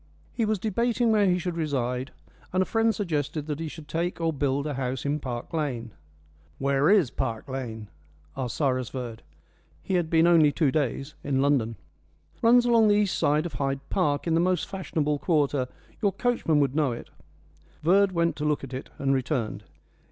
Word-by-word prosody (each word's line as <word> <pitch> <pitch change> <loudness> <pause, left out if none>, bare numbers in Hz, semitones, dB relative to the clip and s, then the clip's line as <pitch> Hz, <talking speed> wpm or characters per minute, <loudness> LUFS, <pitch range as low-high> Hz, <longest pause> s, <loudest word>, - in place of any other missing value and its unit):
He 230 - 0
was 215 0 +1
debating 230 +4 +1
where 210 -2 +4
he 180 -1 +3
should 180 -1 -3
reside, 130 -4 -1 0.4
and 185 +1 +2
a - - -5
friend 225 +1 +1
suggested 150 -5 -2
that 150 -1 -4
he 165 - -3
should 155 -1 -9
take 170 +3 -2
or 165 -1 0
build 140 0 0
a 150 - -2
house 130 0 -3
in 145 +1 0
Park 125 -2 -6
Lane. 130 -8 -2 0.7
"Where 140 +2 +2
is 195 - +4
Park 115 -4 -3
Lane?" 120 -5 -5 0.5
asked 130 -3 -4
Cyrus 130 -4 0
Verd. 120 -4 -6 0.6
He 190 - -3
had 175 -3 +1
been 165 0 +4
only 165 -4 +6
two 145 -1 +1
days 135 0 -1
in 135 -2 0
London. 135 -5 +2 0.7
"Runs 240 +1 +6
along 230 -2 +5
the 205 - +5
east 205 -2 +2
side 150 +3 +2
of 170 - -5
Hyde 135 +1 -2
Park, 145 -7 +1
in 165 - +1
the 165 - +3
most 180 -1 +1
fashionable 155 -6 -2
quarter. 145 -6 +1 0.3
Your 200 -3 +3
coachman 235 -11 +1
would 140 -1 +1
know 150 -4 +2
it." 115 - -9 0.7
Verd 195 +4 +4
went 170 -1 +1
to 150 - -4
look 150 -2 0
at 135 -1 -8
it, 130 - -6
and 135 -1 +1
returned. 130 -4 -2
150 Hz, 190 wpm, -26 LUFS, 135-180 Hz, 0.7 s, only